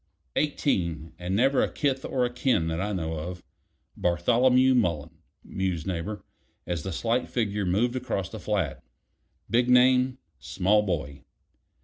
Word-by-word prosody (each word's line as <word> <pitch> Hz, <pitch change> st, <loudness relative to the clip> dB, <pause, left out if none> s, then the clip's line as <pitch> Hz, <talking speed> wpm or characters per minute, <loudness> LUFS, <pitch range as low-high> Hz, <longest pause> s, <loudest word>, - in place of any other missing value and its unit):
"Eighteen; 85 Hz, -, -1 dB
and 90 Hz, +2 st, -2 dB
never 135 Hz, +5 st, +3 dB
a -, -, 0 dB
kith 135 Hz, -3 st, -1 dB
or 125 Hz, -2 st, 0 dB
a 120 Hz, -, -4 dB
kin 125 Hz, -9 st, +1 dB
that 80 Hz, +2 st, -2 dB
I 105 Hz, +2 st, -2 dB
know 80 Hz, -4 st, -3 dB
of. 90 Hz, +3 st, -6 dB, 0.5 s
Bartholomew 125 Hz, +9 st, +3 dB
Mullen," 85 Hz, -, 0 dB, 0.2 s
mused 90 Hz, -4 st, -3 dB
Neighbor, 95 Hz, +3 st, -4 dB, 0.4 s
as 85 Hz, -3 st, -2 dB
the 95 Hz, -, -5 dB
slight 115 Hz, +8 st, -1 dB
figure 105 Hz, -4 st, -1 dB
moved 115 Hz, +7 st, +1 dB
across 115 Hz, -7 st, -2 dB
the 110 Hz, +3 st, -8 dB
flat, 95 Hz, -9 st, -2 dB, 0.6 s
"big 120 Hz, +2 st, +2 dB
name 125 Hz, +1 st, +4 dB, 0.2 s
small 100 Hz, +3 st, +2 dB
boy. 75 Hz, -8 st, -3 dB
105 Hz, 140 wpm, -27 LUFS, 85-125 Hz, 0.6 s, name